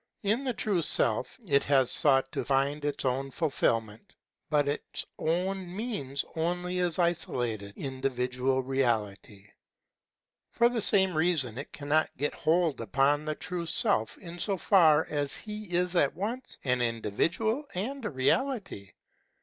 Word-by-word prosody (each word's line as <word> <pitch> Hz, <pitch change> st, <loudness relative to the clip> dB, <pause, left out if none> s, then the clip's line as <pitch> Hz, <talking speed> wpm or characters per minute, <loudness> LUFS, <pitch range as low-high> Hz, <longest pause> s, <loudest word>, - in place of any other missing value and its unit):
In 215 Hz, +6 st, +1 dB
the 255 Hz, -2 st, -1 dB
true 200 Hz, -5 st, 0 dB
Self 120 Hz, -7 st, +4 dB
it 140 Hz, -3 st, +3 dB
has 135 Hz, -3 st, +3 dB
sought 135 Hz, -3 st, +4 dB
to -, -, -3 dB
find 140 Hz, +2 st, 0 dB
its 145 Hz, -1 st, -2 dB
own 135 Hz, +2 st, -1 dB
fulfilment; 125 Hz, -, -2 dB, 0.3 s
but 145 Hz, -2 st, +2 dB
its 145 Hz, -, -3 dB
own 180 Hz, +2 st, -2 dB
means 150 Hz, -, -3 dB
only 180 Hz, +2 st, -2 dB
its 175 Hz, -2 st, +1 dB
isolated 120 Hz, -, -1 dB
individual 130 Hz, -1 st, -1 dB
reality. 110 Hz, -6 st, -2 dB, 1.0 s
For 235 Hz, 0 st, +3 dB
the 240 Hz, -2 st, -1 dB
same 190 Hz, -4 st, +3 dB
reason 155 Hz, -8 st, +1 dB
it 140 Hz, -, -8 dB
can 145 Hz, 0 st, -8 dB
not 155 Hz, +1 st, +3 dB
get 145 Hz, +2 st, -1 dB
hold 165 Hz, -4 st, +1 dB
upon 140 Hz, +7 st, +1 dB
the 155 Hz, 0 st, -2 dB
true 175 Hz, 0 st, -5 dB
Self 110 Hz, -7 st, 0 dB
in 175 Hz, -2 st, -10 dB
so 195 Hz, +2 st, 0 dB
far 160 Hz, -5 st, +4 dB
as 145 Hz, -2 st, -1 dB
he 210 Hz, -1 st, -7 dB
is 180 Hz, +1 st, +1 dB
at 145 Hz, -4 st, +2 dB
once 225 Hz, +8 st, -4 dB
an 125 Hz, -2 st, +1 dB
individual 160 Hz, -, -1 dB
and 255 Hz, +9 st, -4 dB
a 210 Hz, -, -2 dB
reality. 160 Hz, -, -1 dB
150 Hz, 145 wpm, -29 LUFS, 130-180 Hz, 1.0 s, Self